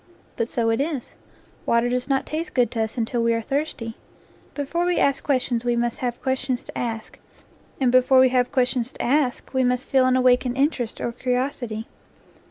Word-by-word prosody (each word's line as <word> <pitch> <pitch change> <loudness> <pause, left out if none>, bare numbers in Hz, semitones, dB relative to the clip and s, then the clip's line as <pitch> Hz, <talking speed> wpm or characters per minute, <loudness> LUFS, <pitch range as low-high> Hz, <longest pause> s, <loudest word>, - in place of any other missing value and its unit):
But 230 +1 -2
so 230 -1 +1
it 225 - +1
is. 285 -4 -3 0.5
Water 235 +1 +3
does 250 +2 -1
not 270 -1 +1
taste 320 +3 -4
good 245 -2 +3
to 225 - -1
us 220 +3 -3
until 235 +1 -1
we 230 0 +2
are 230 - -1
thirsty. 275 -4 -3 0.6
Before 295 +4 -1
we 355 0 +1
ask 280 -1 +2
questions 250 -4 0
we 240 -1 +1
must 235 0 -1
have 245 -1 -2
questions 260 -1 -1
to - - -12
ask, 225 -2 -4 0.6
and 255 -3 +3
be 255 0 +6
fore 260 +1 +4
we 260 - +6
have 250 -1 +1
questions 250 -2 +1
to - - -7
ask 265 0 0
we 260 0 +2
must 250 +1 0
feel 260 -1 +3
an 255 - +3
awak 255 -1 +5
ened 250 -1 -4
interest 270 -5 0
or 235 - -1
curiosity. 245 -2 -2
250 Hz, 200 wpm, -23 LUFS, 240-270 Hz, 0.6 s, be